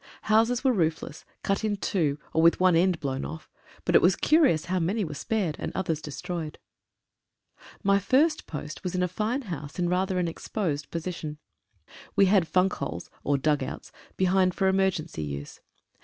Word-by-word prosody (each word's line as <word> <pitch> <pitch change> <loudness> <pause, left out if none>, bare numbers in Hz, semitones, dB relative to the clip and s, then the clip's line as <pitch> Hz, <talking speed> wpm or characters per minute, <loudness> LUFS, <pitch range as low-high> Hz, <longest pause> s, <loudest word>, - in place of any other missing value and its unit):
Houses 230 +4 +3
were 260 -2 +4
roofless, 165 -6 -2 0.2
cut 195 +2 0
in 210 -2 0
two, 160 -8 0 0.2
or 160 - +3
with 170 +1 +5
one 185 -2 +5
end 175 0 +3
blown 135 -1 -3
off, 160 0 -8 0.3
but - - +1
it - - +7
was - - +4
curious 300 - +3
how 185 +1 0
many 195 +5 0
were 155 - -6
spared 180 +1 -1
and - - -3
others 165 -5 -1
destroyed. 155 +2 -5 1.3
My 200 0 +4
first 270 - +2
post 150 -1 -7
was 180 0 -3
in 180 - +1
a - - +2
fine 215 +9 -2
house 150 - -7
in 175 -1 0
rather 185 +1 0
an 180 -1 +1
ex 165 - -7
posed 155 -9 -2
position. 165 -3 -5 0.8
We 200 - +6
had 190 -3 +3
funk 185 +2 +2
holes, 85 +4 -5
or 145 0 +2
dug 150 +1 +1
outs 130 - -6 0.3
behind 185 -1 +3
for 190 - +2
emergency 190 - 0
use. 70 -1 -6
180 Hz, 180 wpm, -27 LUFS, 155-195 Hz, 1.3 s, it